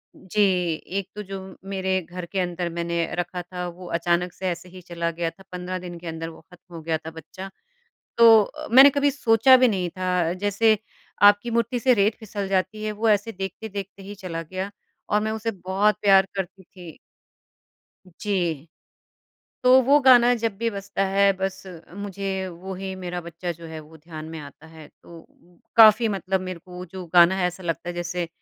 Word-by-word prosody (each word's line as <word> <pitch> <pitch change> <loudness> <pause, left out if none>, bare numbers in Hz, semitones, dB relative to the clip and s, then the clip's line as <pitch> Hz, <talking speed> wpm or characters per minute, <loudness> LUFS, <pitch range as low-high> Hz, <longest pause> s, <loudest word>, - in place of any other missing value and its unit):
जी, 195 +3 -2 0.3
एक 190 +4 -5
तो 210 - -5
जो 190 -1 -9 0.2
मेरे 190 0 0
घर 175 +1 -8
के 195 - -1
अंदर 175 -1 -2
मैंने 170 0 -2
रखा 175 +1 -3
था 180 0 -6
वो 175 +1 -10
अचानक 175 +1 0
से 190 - -5
ऐसे 175 +1 -6
ही 185 +1 -12
चला 170 -1 -3
गया 165 0 -2
था 195 +3 -18
15 180 0 -5
दिन 175 -1 -8
के 175 - -10
अंदर 165 0 -5
वो 160 -1 -14
खत्म 180 0 -16
हो 165 - -7
गया 160 0 -1
था 160 +1 -9
बच्चा। 165 +4 -10 0.7
तो 225 -2 +8
अ, - - -8
मैंने 265 +3 +9
कभी 285 +1 +2
सोचा 260 -1 +5
भी 255 0 +4
नहीं 185 -5 -1
था, 180 -2 -1
जैसे 205 +3 +2 0.4
आपकी 205 +3 +6
मुट्ठी 235 +1 0
से 250 +2 +4
रेत 210 0 +2
फिसल 205 -2 -5
जाती 195 +3 -1
है, 215 - -2
वो 220 +2 -1
ऐसे 210 +1 +2
देखते-देखते 195 +1 -7
ही 200 +2 -8
चला 180 -4 -6
गया 185 +4 -5 0.4
और 210 - +2
मैं 220 - -1
उसे 220 +1 -2 0.2
बहुत 200 +3 +2
प्यार 195 -2 +6
करती 190 0 -5
थी। 175 -4 -13 1.1
जी। 175 -5 -3 0.9
तो 255 +1 +7
वो 280 +4 +5
गाना 245 -2 +6
जब 225 -4 -2
भी 230 +2 -1
बजता 200 -1 -3
है 195 +1 +4
बस 190 0 -3 0.3
मुझे 195 -1 -4
वही 190 +2 -7
मेरा 180 -1 -5
बच्चा 170 +1 -5
जो 170 0 -12
है, 160 -1 -8
वो 155 +1 -15
ध्यान 155 0 -9
में 160 - -7
आता 145 +2 -13
है। 160 -2 -13
तो 170 -1 -13
अ, 175 +1 -27 0.2
काफ़ी 220 0 +7
मतलब 190 -2 -1
मेरे 185 -1 -6
को 180 +1 -10
जो 185 +1 -8
गाना 175 +2 +7
है 185 -2 +1
ऐसा 180 +1 -5
लगता 170 0 -3
है 175 - -4
जैसे 175 0 -3
185 Hz, 190 wpm, -24 LUFS, 175-205 Hz, 1.1 s, मैंने